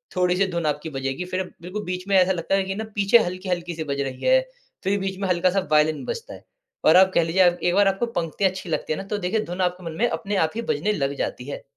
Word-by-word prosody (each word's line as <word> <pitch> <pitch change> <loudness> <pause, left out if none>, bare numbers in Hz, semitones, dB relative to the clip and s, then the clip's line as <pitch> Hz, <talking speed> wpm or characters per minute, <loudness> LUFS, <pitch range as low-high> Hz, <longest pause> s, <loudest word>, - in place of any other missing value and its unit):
थोड़ी-सी 180 +1 +2
धुन 170 -2 -2
आपकी 150 +1 -1
बजेगी 135 +3 -3
फिर 185 +1 -2 0.2
बिल्कुल 185 +5 -5
बीच 185 +1 -4
में 200 - +2
ऐसा 185 0 +4
लगता 180 +1 0
है 195 - +2
कि 190 0 -4
ना 220 - -3
पीछे 205 +3 +5
हल्की-हल्की 180 -1 -3
सी 160 - -3
बज 140 -2 -2
रही 135 -2 -5
है, - - +6 0.4
फिर 200 +1 +1
बीच 190 0 -3
में 195 - -1
हल्का-सा 180 +1 +2
वायलिन 155 0 +3
बजता 475 0 -5
है। - - -12 0.4
और 160 - +7
आप 190 0 +6
कह 170 - +4
लीजिए 165 +4 +1
आप 175 - -6
एक 175 - +2
बार 200 0 +5
आपको 195 +4 +1
पंक्ति 170 +4 -2
अच्छी 185 -1 -1
लगती 155 - -1
है - - -4
ना - - -5
तो - - +1
देखिए 200 +3 -1
धुन 180 +2 -4
आपके 180 0 -1
मन 165 - -4
में 240 - +3
अपने 205 +1 -3
आप - - -12
ही 230 - -2
बजने 195 -1 0
लग 140 -6 -1
जाती 125 - -3
है। - - -6
180 Hz, 265 wpm, -24 LUFS, 165-195 Hz, 0.4 s, और